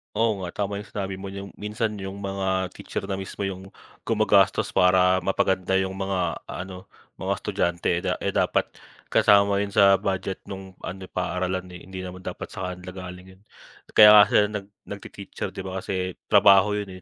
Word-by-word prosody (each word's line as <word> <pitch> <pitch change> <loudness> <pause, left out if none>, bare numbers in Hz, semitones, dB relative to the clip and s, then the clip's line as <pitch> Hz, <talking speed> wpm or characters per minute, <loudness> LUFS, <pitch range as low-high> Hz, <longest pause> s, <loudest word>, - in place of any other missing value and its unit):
Oo 110 -2 +1
nga, 90 -2 -6
tama 100 0 -3
'yong 105 - -9
sinabi 95 -2 -4
mo, 100 - -7
'yong 100 0 -7
minsan 105 0 -3
'yong 95 0 -6
mga 95 -1 -1
teacher - - -6
na 95 -1 -3
mismo 95 +1 -6
'yong 95 -1 -5 0.4
gumagastos - - +3
para 90 0 +4
mapaganda 95 0 0
'yong 95 0 +1
mga 95 -1 -2 0.3
ano 95 0 -8 0.3
mga - - -1
estudyante, 85 0 -1
da - - -1
eh, - - 0
dapat - - +1 0.4
kasama 100 0 +5
'yon 100 -1 -3
sa 100 -1 +6
budget 95 -1 -2
no'ng 95 -1 -9
ano, 95 +2 -7
paaralan, 90 +1 -2
eh. 90 - -10
Hindi 95 0 -8
naman 90 0 -8
dapat 90 - -6
sa 95 -3 -4
kanila 90 0 -9
galing 90 0 -9
'yon. 95 - -27 0.5
Kaya 105 - +9
nga 105 - +10
sila 105 - +4
nag 105 -2 -6 0.2
nag-te-teacher, 100 -1 -7
'di - - -7
ba, 95 0 -4
kasi 95 -1 -3 0.2
trabaho 100 -1 +6
'yon, 105 -1 -4
95 Hz, 175 wpm, -25 LUFS, 95-100 Hz, 0.5 s, nga